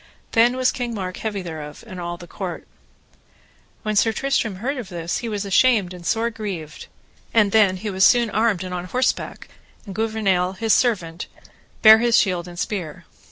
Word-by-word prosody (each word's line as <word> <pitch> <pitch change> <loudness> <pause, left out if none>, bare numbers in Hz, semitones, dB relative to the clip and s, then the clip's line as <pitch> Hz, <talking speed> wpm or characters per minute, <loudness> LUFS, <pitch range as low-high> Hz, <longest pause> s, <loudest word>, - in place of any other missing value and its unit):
Then 235 +2 +4
was 255 0 +2
King 240 -2 -4
Mark 185 -3 -5
heavy 205 -3 -4
thereof, 155 -3 -8
and 185 -5 -8
all 175 0 -4
the 175 - -11
court. 180 0 -6 1.2
When 215 -1 -2
Sir 225 +2 +4
Tristram 235 -4 -1
heard 260 +9 -3
of 235 -7 -6
this 170 -2 -3
he 235 - -4
was 205 -1 -3
ashamed 200 -2 +3
and 180 -1 -10
sore 230 +6 0
grieved; 190 -9 -6 0.5
and 210 -3 +4
then 205 -3 +4
was 185 - -9
he 200 -3 -4
soon 235 +3 +5
armed 215 -4 +1
and 185 -1 -6
on 180 0 -4
horseback, 255 +7 -2 0.4
and 195 - -8
Gouvernail, 200 -4 0
his 220 +3 +1
servant, 180 -9 0 0.6
bare 220 0 +9
his 235 0 +3
shield 180 -3 +1
and 175 0 -10
spear. 175 -4 -4
205 Hz, 180 wpm, -22 LUFS, 180-225 Hz, 1.2 s, bare